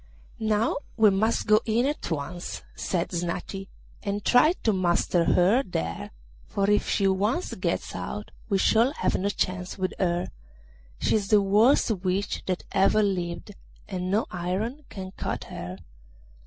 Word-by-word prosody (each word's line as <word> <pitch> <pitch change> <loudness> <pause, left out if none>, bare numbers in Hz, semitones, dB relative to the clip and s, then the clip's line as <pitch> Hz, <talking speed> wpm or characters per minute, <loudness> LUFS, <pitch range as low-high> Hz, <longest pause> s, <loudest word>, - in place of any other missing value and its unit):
'Now 220 +1 +1 0.2
we 215 -3 +6
must 215 +4 +1
go 215 0 +5
in 230 +3 +1
at 290 - -2
once,' 170 +3 -4
said 175 -2 -2
Snati, 175 +2 -4 0.3
'and 205 +1 -3
try 300 +7 +5
to 220 - +3
master 175 -2 +2
her 195 +9 +4
there, 85 - -4 0.4
for 200 0 0
if 210 - +2
she 195 - +2
once 205 - 0
gets - - -2
out - - -5 0.2
we 200 - +3
shall 230 +7 +3
have - - 0
no 200 +2 0
chance 185 -2 -2
with 185 -1 -1
her. 175 -2 0 0.7
She - - +2
is 200 -2 -3
the 210 -1 +5
worst 215 +6 +4
witch 190 0 -1
that 185 -1 -1
ever 195 +2 +4
lived, 180 -1 -2 0.4
and 185 -2 -3
no 210 +4 +2
iron 200 +11 -3
can 190 -1 -7
cut - - -4
her. 90 +1 -7
195 Hz, 155 wpm, -26 LUFS, 180-215 Hz, 0.7 s, we